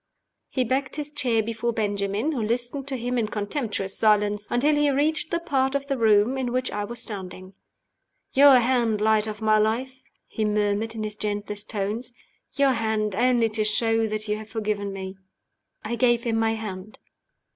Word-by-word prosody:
He 260 - 0
backed 260 +2 -1
his 295 0 -5
chair 250 -7 +1
before 230 +1 -2
Benjamin 205 +4 -1
(who 265 -7 -2
listened 240 +5 -2
to 270 -2 -2
him 245 +1 -1
in 220 - 0
contemptuous 210 -2 -3
silence) 210 -1 +2
until 280 +5 +2
he 295 0 +3
reached 310 +4 0
the 340 - 0
part 270 -5 0
of 280 0 -1
the 280 -1 -1
room 225 +2 +3
in 250 -2 -2
which 255 +1 -1
I 205 0 -2
was 235 +2 -6
standing. 190 -3 -7 0.8
"Your 275 -1 +8
hand, 235 -3 +2
Light 215 0 +2
of 215 0 -6
my 215 0 +4
Life!" 255 +5 -1 0.3
he 220 - -3
murmured 210 +1 0
in 220 - -3
his 210 0 -4
gentlest 205 0 -4
tones. 220 +4 -3 0.4
"Your 280 0 +4
hand 220 -3 -1
only 240 0 +3
to 215 0 -1
show 225 +1 +1
that 215 0 -4
you 210 0 0
have 215 0 -10
forgiven 210 -2 -2
me!" 190 0 -7 0.7
I 230 +2 -2
gave 240 -2 +3
him 230 -2 0
my 225 0 +2
hand. 210 -2 -7
225 Hz, 180 wpm, -25 LUFS, 210-255 Hz, 0.8 s, Your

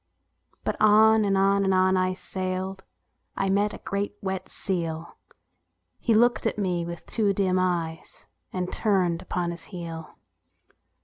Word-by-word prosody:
But - - -2
on 215 +1 +6
and 195 -1 +2
on 195 +1 +3
and 190 -1 +2
on 185 0 +4
I 185 0 +1
sailed; 185 0 -4 0.5
I 195 - 0
met 205 +1 +2
a - - -14
great 200 +1 -2
wet 190 -1 -4
seal, 165 -3 -3 0.8
He 230 - +2
looked 240 +1 +3
at 225 - -2
me 180 -4 0
with 170 -1 -7
two 210 -3 +1
dim 185 -2 +1
eyes, 170 -3 -2 0.3
And 180 -1 -3
turned 185 -5 +1
upon 180 -2 -2
his 170 -1 -8
heel. 165 -4 -8
190 Hz, 145 wpm, -26 LUFS, 180-200 Hz, 0.8 s, on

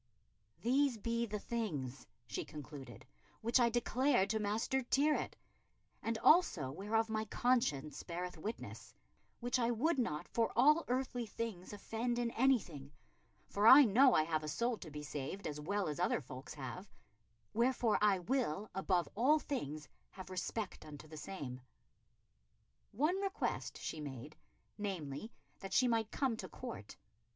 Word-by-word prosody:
"These 260 +1 +3
be 235 +2 -1
the 210 0 -3
things," 160 - -4 0.2
she 105 -4 -4
concluded, 145 -2 -9 0.4
"which 235 +3 +3
I 240 -1 +5
declared 245 -2 +2
to 220 - 0
Master 215 +6 0
Tyrwhitt, 285 +4 +1 0.7
and 230 0 -1
also 195 - +5
whereof 215 +8 0
my 220 0 -1
conscience 215 - +1
beareth 180 +1 -5
witness, 205 +8 -7 0.5
which 245 +1 0
I 235 -1 +2
would 265 +6 +1
not 150 -11 -1
for 230 -1 0
all 300 +6 +5
earthly 250 -2 -1
things 210 -4 -5
offend 225 +4 -2
in 240 -1 0
anything, 195 - +1 0.6
for 205 +2 +2
I 275 +5 +11
know 250 +5 +6
I 155 - +5
have 155 -1 -1
a - - -4
soul 235 +11 0
to 165 - -8
be 150 0 -7
saved 150 +7 -5
as 150 -1 -3
well 200 +4 -1
as 150 +1 -3
other 180 - +2
folks 130 0 -9
have; 150 +8 -7 0.6
wherefore 235 -1 +2
I 205 -2 +5
will, 210 - -1
above 185 -2 +1
all 265 +8 +4
things, 155 - -4 0.2
have 185 -1 -10
respect 185 +2 -3
unto 150 0 -10
the 155 - -10
same." 140 -7 -6 1.3
One 310 - +1
request 395 +1 -2
she 160 - -5
made, 145 +1 -7 0.4
namely, 190 -1 -4 0.3
that 195 0 -7
she 255 - +5
might 225 -2 +1
come 260 -5 0
to - - -6
Court. 240 - -8
210 Hz, 150 wpm, -36 LUFS, 155-245 Hz, 1.3 s, I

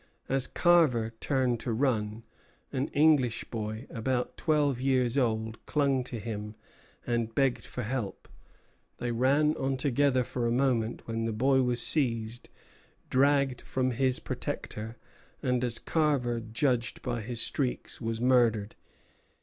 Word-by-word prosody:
As 135 -1 +1
Carver 145 -11 +3
turned 130 -4 0
to 120 - -3
run, 110 -3 0 0.5
an 135 +2 0
English 145 -6 +3
boy, 110 +1 -4
about 125 +1 -2
twelve 145 -5 +1
years 130 -2 +2
old, 110 -4 -1
clung 140 -3 +1
to 125 - -5
him 105 -1 -5 0.5
and 115 -2 -1
begged 135 -3 +1
for 125 - -5
help. 115 -3 -4 0.7
They 120 - -2
ran 140 +6 +3
on 135 0 -1
together 135 -1 +2
for 120 0 -2
a - - 0
moment, 120 -3 0
when 115 0 -2
the 115 - -1
boy 130 +5 +3
was 125 -1 +1
seized, 115 -5 +1 0.6
dragged 140 -1 +3
from 130 -1 -1
his 130 +1 +1
protector, 110 +2 -5 0.5
and, 125 -1 +1
as 120 -2 +1
Carver 140 -7 +1
judged 120 +2 -1
by 120 -2 -2
his 115 +2 -4
shrieks, 130 -2 -2
was 115 -1 -2
murdered. 120 -4 +3
125 Hz, 135 wpm, -29 LUFS, 115-135 Hz, 0.7 s, Carver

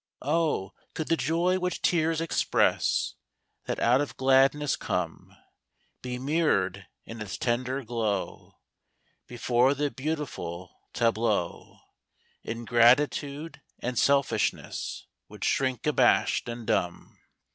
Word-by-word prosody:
Oh, 150 - 0 0.2
could 160 - -4
the 165 - +4
joy 170 +5 +1
which 180 0 -3
tears 165 -1 +2
express 165 - +1 0.5
That - - -3
out 125 +4 +4
of 145 - -5
gladness 135 +2 +3
come - - -4 0.6
Be 125 0 -4
mirrored 125 - 0 0.2
in 115 -1 -9
its 105 -2 -5
tender 130 +2 -1
glow, 110 -4 -3 0.7
Before 125 +2 +2
the 145 0 -1
beautiful 130 - -5 0.2
tableau 115 -6 -1 0.6
Ingratitude 130 +6 +2 0.2
and 125 -1 -2
selfishness 140 -6 0 0.2
Would - - -6
shrink 130 -2 0
abashed 150 -4 +3
and 120 -1 -6
dumb! 90 -4 -2
130 Hz, 105 wpm, -27 LUFS, 115-150 Hz, 0.7 s, the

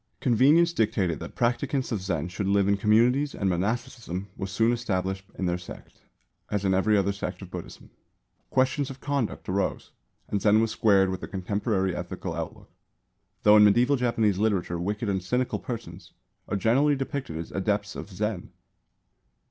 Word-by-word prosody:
Convenience 145 +7 +4
dictated 105 - 0
that - - -8
practicants 125 +3 0
of 110 -4 -1
Zen 85 -4 -2
should 95 +2 -3
live 100 0 +3
in 100 - +3
communities 120 +8 +3
and 100 - -1
monasticism 100 0 -2
was 95 -1 -5
soon 115 +4 +2
established 95 -5 -2
in 95 - -3
their 90 0 0
sect, 90 - -12 0.5
as 100 -1 -1
in 95 - +3
every 105 +3 +3
other 100 0 +2
sect 95 -2 -5
of 90 - -11
Buddhism. 90 -2 -9 0.6
Questions 130 +2 +1
of 135 -1 -9
conduct 140 -5 -2
arose, 95 +1 -2 0.4
and 100 - -1
Zen 105 +1 +5
was 115 -1 +1
squared 100 -4 +3
with 95 - -4
the - - -5
contemporary 95 0 -1
ethical 90 0 -5
outlook; 85 -1 -7 0.7
though 105 0 +7
in 105 - +8
medieval 120 +7 +5
Japanese 115 -6 +1
literature 95 -5 0
wicked 105 +5 -2
and 95 -2 0
cynical 125 +7 -1
persons 95 -8 -7 0.3
are 100 - -1
generally 135 +8 +3
depicted 135 - -4
as 80 - -6
adepts 100 +1 -1
of - - -7
Zen. 100 -1 -3
100 Hz, 165 wpm, -26 LUFS, 95-120 Hz, 0.7 s, in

